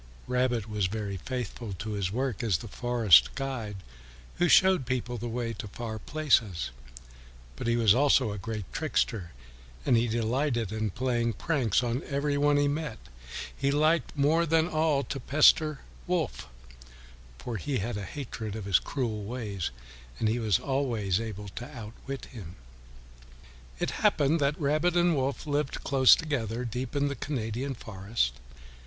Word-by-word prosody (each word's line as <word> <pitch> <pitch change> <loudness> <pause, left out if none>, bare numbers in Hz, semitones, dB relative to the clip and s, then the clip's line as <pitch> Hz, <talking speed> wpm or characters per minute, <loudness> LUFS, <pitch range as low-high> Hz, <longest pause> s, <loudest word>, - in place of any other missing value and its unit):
Rabbit 125 -3 0
was 105 -3 0
very 100 -1 -4
faithful 120 0 -5
to 110 +4 -5
his 100 -3 -1
work 130 0 -2
as 110 -8 +2
the 115 - -9
forest 120 -5 +4
guide 130 -7 -4 0.6
who 175 0 +3
showed 185 -9 +5
people 125 -1 -2
the 120 +2 -4
way 115 0 -2
to 105 0 -7
far 110 +2 -6
places. 115 - +1 0.8
But 65 - -5
he 115 - +3
was 115 -4 +5
also 135 -3 +4
a 105 - -5
great 105 0 -4
trickster, 115 - -1 0.6
and - - +4
he 115 +1 +3
delighted 120 0 0
to 110 0 -2
play 120 +2 0
pranks 125 - +1
on 120 +2 -1
every 145 0 -1
one 145 0 +3
he 145 0 +3
met. 150 -4 -2 0.6
He 140 - 0
liked 155 +2 +2
more 160 +4 +3
than 160 +1 +3
all 155 -4 +1
to 135 +2 -5
pester 155 +2 +4 0.3
Wolf, - - -1 0.9
for 115 - -5
he 140 +6 -2
had 115 +2 -2
a 105 - -4
hatred 115 -3 -6
for 110 - -4
his 95 -3 +3
cruel 115 -6 -3
ways, 105 -6 -3 0.5
and 110 - 0
he 115 +3 +1
was 110 -6 +2
always 115 -9 0
able 105 -2 -6
to 120 +7 -8
outwit 120 +5 -7
him. 95 -8 -10 1.2
It - - -1
happened 150 +4 +3
that 140 +1 +1
Rabbit 155 +4 +2
and 175 -1 +4
Wolf 135 +2 -1
lived 145 -1 -1
close 135 -2 +6
together, 125 -7 -2
deep 125 +3 -4
in 145 0 +2
the 140 - -2
Canadian 130 0 -3
forest. 100 - -2
120 Hz, 160 wpm, -28 LUFS, 110-140 Hz, 1.2 s, close